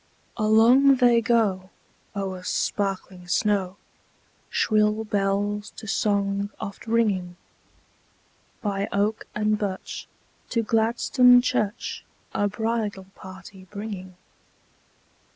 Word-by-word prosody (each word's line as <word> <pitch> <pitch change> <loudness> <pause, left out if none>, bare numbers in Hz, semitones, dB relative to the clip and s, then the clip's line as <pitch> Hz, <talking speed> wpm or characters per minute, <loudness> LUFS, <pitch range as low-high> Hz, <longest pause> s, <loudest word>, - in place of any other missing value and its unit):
Along 235 +5 +5
they 240 -2 +4
go, 205 -5 +1 0.5
o'er 190 -2 -3
sparkling 190 -1 -2
snow, 195 0 0 0.7
Shrill 215 0 +2
bells 205 0 -1
to 220 - -9
song 200 -1 0
oft 205 0 -7
ringing; 200 -6 +1 1.3
By 200 -1 -1
oak 210 +2 0
and 210 0 +1
birch, 195 -2 -5 0.4
to 230 -2 0
Gladstone 235 +3 +4
church 215 -3 -2 0.3
A 205 - +1
bridal 215 -2 -2
party 190 0 -12
bringing. 200 -3 -7
205 Hz, 90 wpm, -25 LUFS, 195-220 Hz, 1.3 s, Along